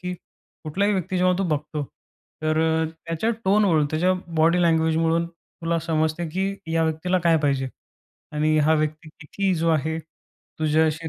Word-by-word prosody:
की 180 0 -4 0.5
कुठल्याही 200 +7 +1
व्यक्ती 185 0 -2
जेव्हा 180 0 +3
तू 195 - +1
बघतो, 150 0 -2 0.6
तर 155 0 +1
अ, 160 0 +2 0.2
त्याच्या 165 +7 -1
टोनवरून, 190 -6 +3
त्याच्या 175 +4 +2 0.2
बॉडी 165 +3 +4
लँग्वेजवरून 165 0 +2
तुला 170 0 -4
समजते 160 +1 -1
की 190 +4 -1 0.2
या 165 0 +2
व्यक्तीला 160 +4 0
काय 165 -1 +5
पाहिजे? 135 -2 +1 0.6
आणि 155 +1 +1
हा 155 +1 +4
व्यक्ती 155 0 -2
किती 190 +6 -1
जो 165 0 0
आहे 160 +1 0 0.6
तुझ्या 155 0 +3
अशी 160 +1 -2
160 Hz, 150 wpm, -24 LUFS, 155-175 Hz, 0.6 s, काय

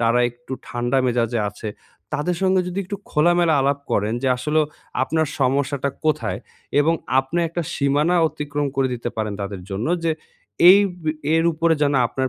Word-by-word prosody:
তারা 115 +1 +3
একটু 120 +2 -12 0.2
ঠান্ডা 120 +2 0
মেজাজে 120 -1 0
আছে, 105 +2 -7 0.4
তাদের 150 +4 -1
সঙ্গে 190 0 +3
যদি 180 +2 -4
একটু 200 +2 -5
খোলামেলা 170 +1 +3
আলাপ 140 +1 +1
করেন 105 +3 +1
যে, 135 - +2
আসলেও 150 +4 +1 0.4
আপনার 160 +3 +1
সমস্যাটা 140 +1 +1
কোথায়? 155 - 0 0.4
এবং 165 +3 +3 0.2
আপনি 135 +6 0
একটা 170 +1 -3
সীমানা 145 +5 +2
অতিক্রম 145 -1 -3
করে 135 -1 +2
দিতে 120 0 -4
পারেন 105 -2 -2
তাদের 100 -2 -5
জন্য 100 +7 -2 0.2
যে, 165 - +2 0.6
এই 200 - +8 0.2
ব - - -15 0.3
এর 165 - +3
উপরে 165 +1 +2
যেন 145 -1 +2
আপনার 130 +2 -2
140 Hz, 165 wpm, -22 LUFS, 120-160 Hz, 0.6 s, এই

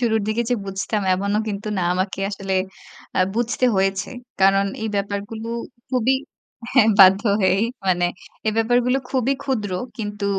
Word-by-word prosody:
শুরুর 220 -2 +2
দিকে 225 +2 +1
যে 245 - +4
বুঝতাম, 195 +2 -2
এমনও 200 +2 0
কিন্তু 205 +1 -4
না, - - 0
আমাকে 185 +1 -2
আসলে 195 -1 -4 0.6
আ - - +2 0.2
বুঝতে 240 +2 0
হয়েছে। 195 0 0 0.3
কারণ, 195 +1 +5 0.2
এই 220 - -1
ব্যাপারগুলো 205 +3 -4 0.4
খুবই 255 0 +2 0.6
হ্যাঁ 250 -4 +5
বাধ্য 195 +2 +8 0.2
হয়েই, 190 +2 +3 0.2
মানে 175 -1 +2 0.4
এই 215 - +2
ব্যাপারগুলো 245 +3 +2
খুবই 260 0 +1
ক্ষুদ্র, 230 -8 -2 0.3
কিন্তু 205 -1 -4
205 Hz, 145 wpm, -22 LUFS, 195-230 Hz, 0.6 s, বাধ্য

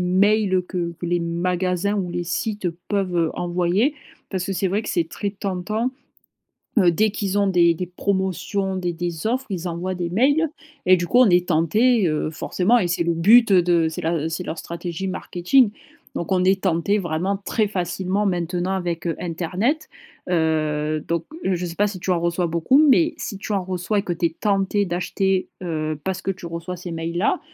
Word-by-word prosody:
mails 190 +1 +3
que 175 -2 -2
que 175 - -4
les 175 +1 +1
magasins 180 +3 0
ou 185 -4 -2
les 175 0 -2
sites 205 +1 -2 0.2
peuvent, 195 -4 0
heu, 165 -2 +2
envoyer 180 - +1 0.4
parce 185 -2 -2
que 195 - -2
c'est 190 0 0
vrai 205 +4 0
que - - -7
c'est 165 -2 0
très 200 +3 -3
tentant. 205 +5 -2 0.9
Heu, 180 -4 +6
dès 215 +6 +2
qu'ils 200 -1 -1
ont 200 - +3
des 170 -2 +4
des 180 +2 -4
promotions, 190 +1 -1
des 180 -2 -1
des 170 +2 -3
offres, 260 +3 -1
ils 180 -2 -3
envoient 180 +2 -3
des 175 -1 -3
mails 285 - +3 0.4
et 185 0 +6
du 175 - -2
coup, 245 - +4
on 250 -5 +6
est 175 0 +3
tentés, 195 +7 +3
heu, 155 0 -1
forcément 190 +8 +1
et 175 -4 0
c'est 170 0 +1
le 170 - +2
but, 215 +8 +6
heu, 180 -2 +6
de 170 -2 +3
c'est 160 - -5
la, 165 - 0
heu, 160 - -1
c'est 170 +2 -3
leur 165 - -4
stratégie 170 +3 -5
marketing. 190 +5 +2 0.4
Donc 170 - -4
on 185 -1 +3
est 190 0 +3
tentés, 190 +3 +2
vraiment 180 +2 -1
très 215 -3 +1
facilement, 190 +1 -1
maintenant 180 0 -1
avec, 175 -3 -2
heu, 165 - -1
internet, 180 - -1 0.4
heu, 155 -2 0
donc 170 -1 -1 0.2
je 180 -1 0
sais 170 - -6
pas 205 +2 +2
si 195 -3 -6
tu 185 - -5
en 175 - +2
reçois 170 0 0
beaucoup 170 - +3
mais 325 +4 +4
si 200 - -5
tu 205 - -6
en 195 - +1
reçois 185 +3 -1
et - - +1
que 175 - -2
tu 170 0 +1
es 165 - -11
tenté 200 0 +1
d'acheter, 185 +2 -1
heu, 155 -3 -2
parce 190 0 -2
que 195 - -1
tu 180 -2 -9
reçois 170 +2 -5
ces 175 -1 -7
mails-là, 170 - -1
180 Hz, 205 wpm, -22 LUFS, 170-200 Hz, 0.9 s, Heu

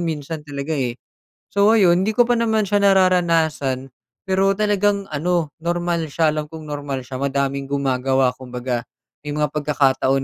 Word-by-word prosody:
minsan 160 -2 -4
talaga, 145 0 -5
eh. 125 -5 -1 0.5
So 200 +1 +3
ayun, 185 -5 +4
hindi 215 - +1
ko 235 +2 +3
pa 245 - +3
naman 220 -3 +1
siya 205 +1 +1
nararanasan 165 -8 +2 0.4
pero 195 +1 +2
talagang 205 -1 +1
ano 160 0 -1
normal 170 -1 -1
siya, 155 +1 +1
alam 150 -1 -4
kung 160 -1 -9
normal 145 -3 -5
siya, 130 0 -6
madaming 140 0 -1
gumagawa 135 -2 +1
kumbaga 125 -1 -4 0.4
may 150 - -8
mga 150 -1 -1
pagkakataon 135 -3 +1
155 Hz, 150 wpm, -21 LUFS, 140-185 Hz, 0.5 s, ayun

